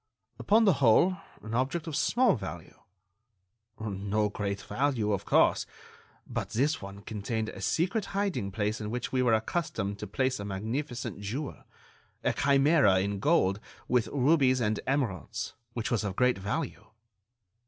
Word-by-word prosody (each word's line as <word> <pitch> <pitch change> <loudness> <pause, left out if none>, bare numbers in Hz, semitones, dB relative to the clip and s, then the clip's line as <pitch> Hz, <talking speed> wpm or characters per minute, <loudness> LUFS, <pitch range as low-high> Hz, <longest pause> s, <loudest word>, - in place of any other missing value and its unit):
"Upon 220 +2 +4
the 195 - +6
whole, 155 +10 +5 0.3
an 110 - -6
object 135 +7 0
of 160 -3 -4
small 240 - +3
value." 95 -6 -7 1.0
"No 105 0 -1
great 100 -1 -3
value, 130 -6 0
of 100 0 -2
course. - - +3 0.6
But - - -4
this 145 +8 0
one 100 0 -8
contained 110 +1 -3
a - - -9
secret 185 +5 0
hiding 195 - -1
place 105 +3 -1
in 105 - -4
which 120 +2 -3
we 130 - +1
were 120 -3 +4
accustomed 110 - -2
to 105 - -5
place 130 +4 0
a - - -4
magnificent 115 +4 -4
jewel, 125 +9 -5 0.6
a - - +2
chimera 140 - +4
in 100 +1 -1
gold, 100 - +3
set - - -20
with 125 -2 +2
rubies 135 -2 +3
and 110 -2 0
emeralds, 125 - -2 0.2
which 115 +1 -3
was 115 -3 +1
of 100 -2 -3
great 125 -3 +2
value." 110 +2 -3
115 Hz, 155 wpm, -29 LUFS, 100-145 Hz, 1.0 s, the